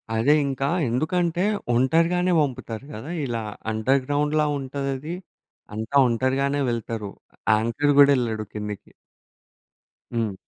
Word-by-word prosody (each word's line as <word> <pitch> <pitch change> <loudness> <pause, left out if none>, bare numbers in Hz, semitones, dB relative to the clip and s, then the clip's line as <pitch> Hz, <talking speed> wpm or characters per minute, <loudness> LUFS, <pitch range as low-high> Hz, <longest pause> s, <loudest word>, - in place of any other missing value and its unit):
అదే 115 +7 +4
ఇంకా 135 0 -1 0.2
ఎందుకంటే 170 +7 0 0.3
ఒంటరిగానే 165 +8 +2
పంపుతారు 130 -4 -3
గద. 110 +6 -8 0.2
ఇలా 115 -3 -3 0.3
అండర్‌గ్రౌండ్‌లా 145 +6 +1
ఉంటదది. 135 +3 -4 0.6
అంతా 110 +5 -4
ఒంటరిగానే 135 +4 0
వెళ్తారు. 110 -3 -4 0.4
యాంకర్ 115 +7 +1
కూడా 140 0 +8
ఎళ్ళడు 110 -3 -2
కిందకి. 105 -1 -6 1.2
హ్మ్. 115 -4 -1
130 Hz, 95 wpm, -24 LUFS, 115-145 Hz, 1.2 s, కూడా